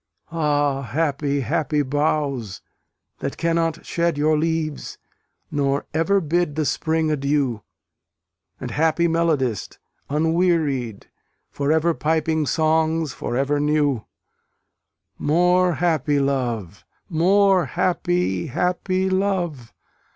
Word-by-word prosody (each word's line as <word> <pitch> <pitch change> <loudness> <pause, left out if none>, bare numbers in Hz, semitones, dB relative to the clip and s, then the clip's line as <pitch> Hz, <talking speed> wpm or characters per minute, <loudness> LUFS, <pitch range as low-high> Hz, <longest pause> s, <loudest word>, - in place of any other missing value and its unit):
Ah, 145 -4 +1
happy, 140 0 -1
happy 150 +4 0
boughs! 140 -6 -1 0.6
that 140 - -4
cannot 165 -1 0
shed 170 -2 0
Your 155 +1 +2
leaves, 155 -1 -2 0.5
nor 140 -1 0
ever 165 +6 +2
bid 170 -2 0
the 155 -1 0
Spring 160 +1 0
adieu; 140 -5 0 1.0
And, - - -5
happy 160 +2 +2
melodist, 155 - 0 0.3
unwearied, 155 - 0 0.5
For 140 +1 -1
ever 160 +2 +2
piping 160 -1 0
songs 160 -1 +1
for 120 - -4
ever 140 +2 +1
new; 145 -5 +1 1.2
More 180 +3 +3
happy 155 -4 +1
love! 120 -9 -2 0.2
more 190 +2 +3
happy, 175 - 0
happy 180 +5 0
love! 185 - -1
155 Hz, 100 wpm, -22 LUFS, 140-170 Hz, 1.2 s, More